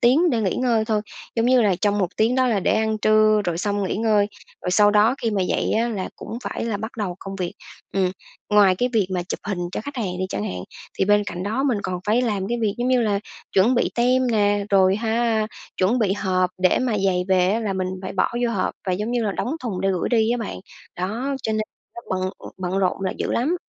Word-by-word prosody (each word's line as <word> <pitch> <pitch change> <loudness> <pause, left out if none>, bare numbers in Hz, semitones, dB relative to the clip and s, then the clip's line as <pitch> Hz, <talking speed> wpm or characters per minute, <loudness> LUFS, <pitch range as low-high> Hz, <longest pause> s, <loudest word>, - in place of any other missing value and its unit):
tiếng 295 +8 +4
để 235 -3 +1
nghỉ 190 -4 0
ngơi 235 -3 +2
thôi, 215 -1 0 0.4
giống 230 +1 +2
như 255 -1 +5
là, 200 -3 +3
trong 205 0 +2
một 185 -3 +1
tiếng 225 +3 +2
đó 260 -1 +3
là 215 -5 +1
để - - +2
ăn 220 0 0
trưa 215 0 +4
rồi 170 -1 -1
xong 205 +1 -1
nghỉ 190 - -2
ngơi, 215 -2 +3 0.4
rồi 180 - -1
sau 205 +2 +5
đó 215 +4 +4
khi 225 - +1
mà 195 -3 0
dậy - - 0
á 230 +2 +1
là 200 -5 -3
cũng 225 - -7
phải - - -3
là 225 -3 -1
bắt 220 +3 -6
đầu 185 -5 -3
công 195 0 -7
việc. 180 -2 -3 0.4
Ừm, 190 -2 +1 0.4
ngoài 205 -3 +6
cái 250 - +1
việc 210 -5 +2
mà 175 - 0
chụp 175 - -5
hình 200 -4 -3
cho - - -2
khách 285 +4 -8
hàng 185 -6 -2
đi 185 - -1
chẳng 105 - -3
hạn, 90 -3 -4 0.4
thì - - +3
bên 205 +1 +4
cạnh 180 0 -4
đó 220 +7 -1
mình 250 -7 +1
còn 180 -1 -3
phải 230 +4 +3
làm 205 -4 -1
cái 240 0 -1
việc, 210 -3 +1
giống 245 - 0
như 255 -1 +3
là, 205 -2 +1 0.3
chuẩn 210 +7 +4
bị 245 - +2
tem 255 +2 +3
nè, 205 -3 +2
rồi 190 0 +4
ha 225 -1 +1 0.3
chuẩn 205 +7 +2
bị 200 -4 +2
hộp 185 -3 0
để 185 -1 +3
mà 255 -3 0
giày 185 -2 +1
về 185 -1 +4
á 225 +3 +1
là 205 -3 -1
mình 185 -1 -1 0.2
phải 185 - -5
bỏ 185 - +1 0.2
vô 235 - +1
hộp 195 -5 -1
và 185 - +1
giống 210 +5 -2
như 240 -1 0
là 205 -2 0
đóng 285 +11 -2
thùng 215 -7 -3
để 195 - +1
gửi 180 - -1
đi 225 -2 +2
á 245 - +2
bạn. 225 - -5 0.4
Đó, 230 +10 -2
cho 220 - -1
nên 215 0 0 0.3
nó - - -7
bận, 185 0 -1
ừm, - - -10
bận 185 +1 -2
rộn 185 0 0
là 185 - 0
dữ - - -1
lắm. 305 +9 +1
210 Hz, 260 wpm, -23 LUFS, 190-230 Hz, 0.4 s, ngoài